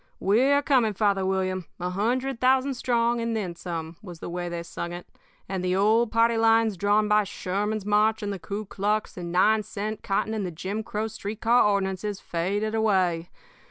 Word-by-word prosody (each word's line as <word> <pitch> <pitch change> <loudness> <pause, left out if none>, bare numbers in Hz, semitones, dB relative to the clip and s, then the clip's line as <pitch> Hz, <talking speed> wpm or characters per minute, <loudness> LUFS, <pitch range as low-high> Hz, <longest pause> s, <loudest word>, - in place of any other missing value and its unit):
'We're 265 +8 +3
coming, 245 -7 +2
Father 200 -1 +2
William, 185 -2 -1
a 180 +1 -2
hundred 245 +6 -1
thousand 265 +2 +3
strong 240 -1 +1
and 230 0 -1
then 190 -6 -2
some,' 165 -1 -6
was 180 -5 -9
the 165 - -7
way 175 0 -3
they 170 -1 -4
sang 170 0 -6
it. 175 0 -7 0.4
And 190 -1 -3
the 180 0 +1
old 220 +4 +3
party 230 0 +3
lines 225 -1 +3
drawn 205 +3 +2
by 210 0 +4
Sherman's 205 +2 -3
march 215 +1 +2
and 205 -1 -2
the 195 - -6
Kuklux 205 +2 -2
and 175 -1 -6
nine 215 +5 +4
cent 210 +1 -5
cotton 205 +2 -1
and 215 -2 -2
the 185 - -2
Jim 190 +6 -4
Crow 215 0 -3
street 220 -1 -6
car 235 +2 +4
ordinances 200 0 -1
faded 200 +6 -2
away. 185 -6 +1
205 Hz, 185 wpm, -26 LUFS, 185-220 Hz, 0.4 s, by